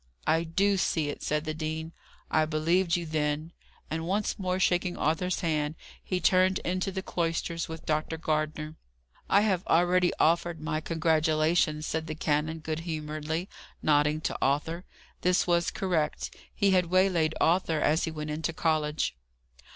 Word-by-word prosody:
"I 165 +1 +2
do 195 +4 +2
see 160 -4 0
it," - - -6
said 150 +1 -1
the 155 - -2
dean. 160 +1 -4 0.4
"I 155 - +3
believed 165 +3 +1
you 175 -1 -2
then." 155 0 -1 0.4
And 160 +1 -3
once 205 +3 -1
more 185 -1 -1
shaking 180 -1 +1
Arthur's 165 +4 0
hand, 155 -2 0 0.3
he 185 - -1
turned 185 +1 +4
into 185 +2 -1
the 190 0 -4
cloisters 165 -1 -2
with 160 0 -7
Dr. 155 +1 -1
Gardner. 155 0 -2 0.5
"I 200 - +5
have 190 -4 +1
already 175 +1 +3
offered 170 0 +2
my 155 0 -2
congratulations," 155 -1 +1
said 160 +1 -2
the 155 - -4
canon, 155 +1 -1
good 155 0 -3
humouredly, 155 +1 -3 0.4
nodding 150 0 +3
to - - -2
Arthur. 160 +6 0 0.4
This 180 0 +3
was 170 -1 +2
correct. 170 -6 -1 0.2
He 200 -2 +2
had 180 -2 +3
waylaid 180 -3 +2
Arthur 165 -2 +2
as 155 +2 +2
he - - -3
went 155 -1 -5
into 155 +1 -2
college. 155 - 0
160 Hz, 155 wpm, -28 LUFS, 155-180 Hz, 0.5 s, I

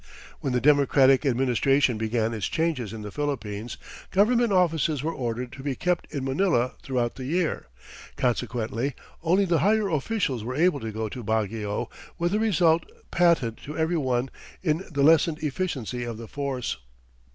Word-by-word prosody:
When 135 - -2
the 125 - +2
Democratic 140 -1 +4
Administration 130 0 +2
began 110 0 0
its 110 -4 -2
changes 160 -10 -1
in 110 -1 -7
the 105 - -6
Philippines, 115 -5 -4 0.3
government 235 +3 +3
offices 165 -6 +2
were 165 +2 -1
ordered 120 -1 -3
to 135 - -9
be 135 -1 -2
kept 180 +4 -1
in 140 -3 -3
Manila 135 -3 +1
throughout 125 -3 -2
the 130 - -6
year, 170 +4 -1 0.5
consequently 120 +1 -1 0.3
only 180 +4 +3
the 170 -3 +2
higher 210 0 +2
officials 150 - -1
were 125 +3 -4
able 165 0 +3
to 110 -3 -5
go 110 +1 -3
to 120 +3 -7
Baguio, 110 +1 -1 0.3
with 175 +2 0
a 210 - +2
result 170 -7 +3 0.3
patent 165 -10 +3
to 150 - -8
every 160 +2 +1
one 130 -4 0 0.3
in 160 +1 +1
the 140 -4 0
lessened 160 +1 +5
efficiency 135 - -2
of 120 -2 -5
the 115 0 -8
force. 135 - -3
135 Hz, 165 wpm, -26 LUFS, 120-165 Hz, 0.5 s, lessened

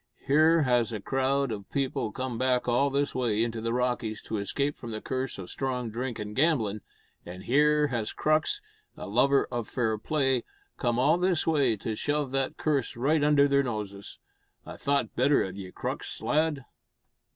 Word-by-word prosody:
Here 155 +3 +4
has 120 -3 +2
a 110 - -3
crowd 135 +3 0
o' 105 -2 -4
people 135 -5 -1
come 130 -2 -4
back 125 -1 +1
all 125 +4 +3
this 140 +1 0
way 115 -4 +1
into 115 -1 -3
the 115 +1 -1
Rockies 120 -3 -1
to 110 - -3
escape 140 +8 -1
from 120 - -9
the 110 -1 -4
curse 130 +3 -3
o' 95 - -6
strong 125 +2 -3
drink 120 +1 -4
and 105 -1 -6
gamblin', 125 -9 +1 0.4
an' 90 +1 -9
here 150 +6 +3
has 115 -4 -2
Crux 155 0 +1 0.4
a - - -6
lover 135 +7 +3
o' 120 -1 -1
fair 110 -1 -1
play 135 -1 +1 0.3
come 120 -1 0
all 150 +7 +3
this 180 -2 +1
way 140 -8 +2
to 110 +2 -4
shove 145 +2 -1
that 135 -1 -1
curse 145 -6 0
right 145 +5 +2
under 145 -1 +5
their 140 0 +3
noses. 105 -6 -5 0.5
I'd - - -9
thowt 140 0 0
better 140 +3 +3
of 95 -1 -6
ye, 95 -2 -8
Crux, - - -5
lad." 150 -3 0
130 Hz, 180 wpm, -28 LUFS, 115-140 Hz, 0.5 s, under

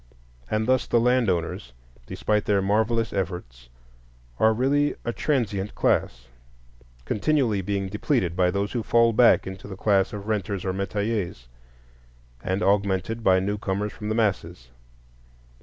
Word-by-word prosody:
And 110 +1 -1
thus 130 0 +2
the 120 - +3
land 125 -1 +2
owners, 85 -8 -3 0.3
despite 105 -1 -1
their 100 -1 +2
marvellous 110 +3 0
efforts, 85 -11 -5 0.7
are 110 - +5
really 140 +5 +1
a 120 - -1
transient 105 -10 -1
class, - - 0 0.8
continually 120 -4 +1
being 100 0 -2
depleted 105 - -1
by 90 -1 +3
those 100 +2 -2
who 120 - -2
fall 115 +1 +3
back 120 +2 +5
into 95 +1 -8
the 95 -2 -8
class 100 -2 +2
of 105 0 -7
renters 100 -3 -2
or 95 - -1
metayers, 100 - -3 1.0
and 95 +3 -1
augmented 100 +2 0
by 95 -2 +4
newcomers 100 +1 -2
from 105 - -6
the 110 - 0
masses. 100 - -1
100 Hz, 140 wpm, -25 LUFS, 95-115 Hz, 1.0 s, are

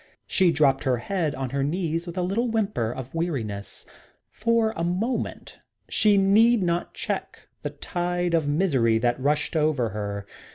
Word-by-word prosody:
She 185 -3 +3
dropped 140 -4 +3
her 130 -2 +2
head 160 +4 -2
on 130 -2 -4
her 140 0 0
knees 165 +2 -1
with 170 +1 -7
a 180 - +1
little 205 +7 0
whimper 210 - 0
of 130 +1 -7
weariness. 125 - -3 0.5
For 230 0 +1
a 165 - -2
moment 195 +9 -2 0.3
she 210 -2 +4
need 210 +3 +5
not 170 0 -1
check - - -4
the - - -3
tide 175 -1 -2
of 160 -3 +2
misery 140 -8 +2
that 120 +2 0
rushed 150 +4 0
over 150 -7 +2
her. 100 -1 -4
165 Hz, 160 wpm, -25 LUFS, 130-190 Hz, 0.5 s, need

